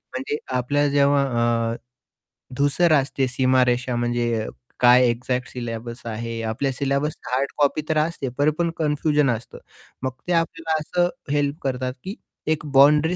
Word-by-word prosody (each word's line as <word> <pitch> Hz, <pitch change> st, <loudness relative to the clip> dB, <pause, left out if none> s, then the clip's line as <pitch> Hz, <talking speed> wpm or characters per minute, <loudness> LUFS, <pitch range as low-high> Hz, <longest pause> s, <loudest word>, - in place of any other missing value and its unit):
म्हणजे 135 Hz, +3 st, -2 dB, 0.2 s
आपल्या 145 Hz, +4 st, +1 dB
जेव्हा 140 Hz, 0 st, +3 dB, 0.5 s
अ, -, -, -4 dB, 0.8 s
धूसर 150 Hz, +4 st, +3 dB
असते 135 Hz, -2 st, +1 dB
सीमारेषा 125 Hz, -1 st, +2 dB
म्हणजे 120 Hz, -2 st, 0 dB, 0.3 s
काय 125 Hz, 0 st, +6 dB
एक्झॅक्ट 125 Hz, +1 st, -2 dB
सिलेबस 120 Hz, 0 st, -6 dB
आहे 115 Hz, +1 st, -4 dB
आपल्या 135 Hz, +5 st, -1 dB
सिलेबस 140 Hz, +3 st, -1 dB
हार्ड 135 Hz, +2 st, 0 dB
कॉपी 145 Hz, +1 st, +2 dB
तर -, -, +3 dB
पण 155 Hz, +1 st, +3 dB
असते, 155 Hz, -5 st, -4 dB
तरीपण 155 Hz, +4 st, +2 dB
कन्फ्युजन 150 Hz, -2 st, +1 dB
असतं. 115 Hz, -, -13 dB, 0.5 s
मग 130 Hz, -, 0 dB, 0.2 s
ते 175 Hz, -, +1 dB
आपल्याला 165 Hz, -1 st, 0 dB
असं 175 Hz, +3 st, +1 dB, 0.2 s
हेल्प 145 Hz, +1 st, 0 dB
करतात 130 Hz, -1 st, -2 dB
की 195 Hz, +3 st, -5 dB, 0.3 s
एक 155 Hz, -1 st, 0 dB
बाउंड्री 150 Hz, +5 st, +5 dB
140 Hz, 140 wpm, -23 LUFS, 125-150 Hz, 0.8 s, काय